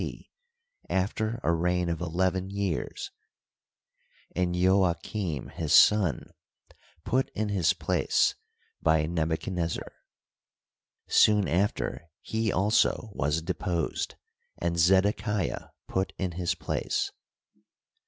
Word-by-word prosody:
C, - - -8 0.6
after 110 +5 -1
a - - +3
reign 90 +1 +1
of 85 -1 -2
eleven 95 +2 0
years, 100 -5 -3 1.2
and 90 0 0
Jojachim, 90 - +1
his - - -2
son, 100 -7 +4 0.7
put 130 +2 +1
in 105 0 -1
his 95 -5 +2
place - - +1 0.5
by 80 -1 +3
Nebuchaclnezzar. 85 +1 -2 1.2
Soon 105 -2 +5
after 90 -2 -1
he 110 -1 -1
also 105 +2 +2
was 75 0 0
deposed, 85 -2 -2 0.4
and 85 0 -1
Zedekiah 95 +3 +2 0.2
put 95 0 -1
in 95 -2 -2
his 85 0 -1
place. - - -2
90 Hz, 95 wpm, -28 LUFS, 85-100 Hz, 1.2 s, Soon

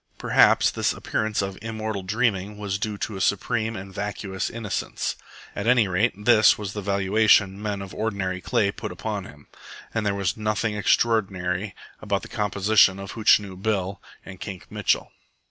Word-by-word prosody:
Perhaps - - +4
this - - 0
appearance 110 -2 -1
of 95 -1 -5
immortal 110 -2 -4
dreaming 105 0 -1
was 100 -2 -3
due 105 0 -3
to 105 -1 -4
a - - -5
supreme 110 +3 0
and 95 0 -8
vacuous 100 -1 -3
innocence. 115 -3 -3 0.4
At 100 - -3
any 120 -4 +4
rate, 95 +2 0
this 110 -2 +6
was 105 -2 -5
the 105 - -4
valuation 100 0 +3
men 105 -2 -3
of 95 - -10
ordinary 95 -4 -2
clay 110 -3 +1
put - - -6
upon 105 -3 -4
him, 75 -4 -14 0.5
and 115 - -1
there 100 -1 0
was 100 -1 -1
nothing 105 0 -1
extraordinary 100 -3 +1 0.3
about 100 -2 -1
the - - -9
composition 105 -1 +3
of 100 0 -7
Hootchinoo 105 -4 +3
Bill 100 -2 -1 0.2
and 95 -2 -10
Kink 95 -4 -8
Mitchell. - - 0
100 Hz, 165 wpm, -24 LUFS, 95-110 Hz, 0.5 s, this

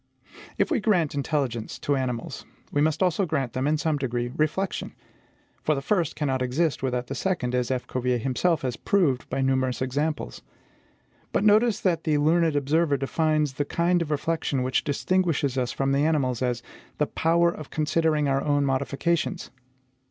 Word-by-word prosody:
If - - +1
we 295 - +2
grant 185 -8 +1
intelligence 140 -5 -2
to 145 - 0
animals, 125 -3 -3 0.3
we 145 - +1
must 155 +3 +2
also 180 +1 +1
grant 135 -7 -1
them, 130 +2 -1
in 155 +1 +2
some 155 -1 0
degree, 120 -3 -2
reflection; 170 +6 -1 0.7
for, 155 - +1
the 135 - -3
first 175 -5 0
cannot 135 -4 -1
exist 140 +5 0
without 125 -2 -1
the 135 - -5
second, 140 -7 -1
as 125 -1 0
F. 130 -1 -1
Cuvier 125 -1 -1
himself 135 +7 0
has 125 -3 -1
proved 150 -9 +1
by 135 +1 -1
numerous 130 -1 +1
examples. 145 +4 -2 0.9
But - - +1
notice 215 +1 +4
that 170 -4 +1
the 155 -2 +2
learned 160 +1 +3
observer 145 +1 +2
defines 150 +1 0
the 145 - -1
kind 175 +3 +1
of 165 - -3
reflection 150 -3 -1
which 130 0 0
distinguishes 150 -3 0
us 125 -2 0
from 135 0 -1
the 140 +1 +2
animals 140 -6 +1
as 125 -2 -1 0.3
the 150 - +2
POWER 170 +3 +2
OF 155 -4 -9
CONSIDERING 155 -1 +1
OUR 135 0 +1
OWN 145 -1 +1
MODIFICATIONS. 140 +5 -1
145 Hz, 170 wpm, -25 LUFS, 130-165 Hz, 0.9 s, notice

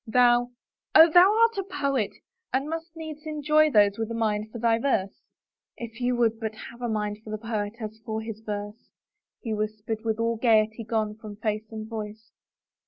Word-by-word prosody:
" - - -41
Thou 245 0 +5 0.2
— - - -45
Oh, 320 +1 +9
thou 360 +4 +7
art 460 -1 +3
a - - -1
poet 280 - -1 0.4
and 270 +3 0
must 325 +1 -5
needs 315 -1 -8
enjoy 305 0 +3
those 205 -4 +4
with 225 0 -2
a 230 - -4
mind 215 -1 -1
for 235 - -7
thy 230 0 +2
verse." 205 -7 -1 0.3
" - - -66
If 235 +1 -8
you 245 0 +1
would 230 -2 +1
but 220 -1 -4 0.2
have 235 +1 -15
a 240 - -2
mind 210 -1 -2
for 220 - -10
the 215 - -3
poet 215 -2 -3
as 220 -1 -7
for 220 -2 -3
his 220 -1 -6
verse," 205 +1 -6 0.5
he 225 -4 -3
whispered, 215 +1 -3
with 220 -1 -1
all 230 0 0
the - - -19
gayety 220 -1 +3
gone 215 -1 -1
from 215 -2 -9
face 215 0 -3
and 220 -1 -6
voice. 220 0 -7
225 Hz, 210 wpm, -26 LUFS, 215-250 Hz, 0.5 s, Oh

